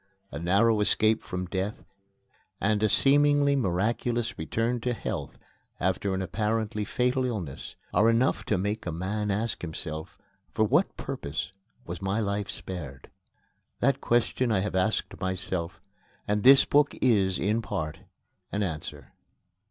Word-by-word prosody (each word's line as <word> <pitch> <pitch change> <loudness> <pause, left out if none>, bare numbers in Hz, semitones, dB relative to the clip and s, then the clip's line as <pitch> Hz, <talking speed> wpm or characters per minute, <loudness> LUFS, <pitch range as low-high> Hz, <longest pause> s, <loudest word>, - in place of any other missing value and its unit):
A 70 - -5
narrow 100 +6 +3
escape 110 +1 +3
from 90 0 -4
death 95 +3 -3 0.7
and 105 +1 +1
a 110 - +3
seemingly 145 +3 +4
miraculous 115 +2 0
return 115 +9 -1
to 125 0 -1
health - - -5 0.4
after 95 +2 0
an 95 - -1
apparently 105 +2 -1
fatal 125 +4 +1
illness 100 - -4 0.2
are 105 +5 +5
enough 115 +4 +2
to - - +1
make 105 +2 -2
a - - -1
man 100 +6 -2
ask 105 +3 -1
himself: 80 -1 -6 0.3
For 110 - +1
what 150 - +2
purpose 95 - -4 0.3
was 85 0 -6
my 95 +3 0
life 100 -1 -1
spared? 75 -8 -7 0.7
That 140 +3 +2
question 120 +1 +1
I 95 -3 +2
have 105 - -3
asked 95 +4 0
myself, 95 -2 -3 0.5
and 105 0 +1
this 135 +3 +8
book 145 0 +3
is, 100 -7 +3
in 105 +5 +1
part, 80 -7 -4 0.5
an 105 +1 0
answer. 80 -5 -6
105 Hz, 140 wpm, -27 LUFS, 95-115 Hz, 0.7 s, this